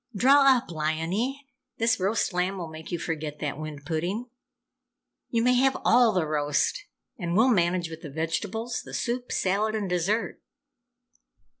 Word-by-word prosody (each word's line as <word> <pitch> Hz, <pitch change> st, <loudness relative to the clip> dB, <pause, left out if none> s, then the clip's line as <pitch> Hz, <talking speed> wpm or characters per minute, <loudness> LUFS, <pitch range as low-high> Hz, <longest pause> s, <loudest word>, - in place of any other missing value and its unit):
Draw 270 Hz, +4 st, +6 dB
up, 235 Hz, -, -6 dB
Liony! 170 Hz, -, -1 dB, 0.4 s
This 225 Hz, -1 st, +2 dB
roast 195 Hz, +1 st, 0 dB
lamb 180 Hz, +2 st, 0 dB
will 170 Hz, -3 st, -5 dB
make 160 Hz, 0 st, -9 dB
you 175 Hz, -, -1 dB
forget 155 Hz, -3 st, -4 dB
that 145 Hz, -1 st, -4 dB
wind 150 Hz, -2 st, -7 dB
pudding. 185 Hz, -, -3 dB, 1.0 s
You 230 Hz, -1 st, +1 dB
may 250 Hz, +1 st, +4 dB
have 265 Hz, +2 st, +3 dB
all 240 Hz, -1 st, +5 dB
the 180 Hz, -5 st, +1 dB
roast, 150 Hz, -, 0 dB, 0.3 s
and 175 Hz, -1 st, -1 dB
we'll 235 Hz, +4 st, +5 dB
manage 175 Hz, -5 st, +2 dB
with 160 Hz, 0 st, -8 dB
the 155 Hz, -, -7 dB
vegetables, 200 Hz, -, -3 dB
the -, -, -8 dB
soup, 245 Hz, +1 st, -2 dB
salad 210 Hz, +3 st, 0 dB
and 210 Hz, -2 st, -2 dB
dessert!" 180 Hz, +5 st, -1 dB
185 Hz, 155 wpm, -26 LUFS, 160-230 Hz, 1.0 s, Draw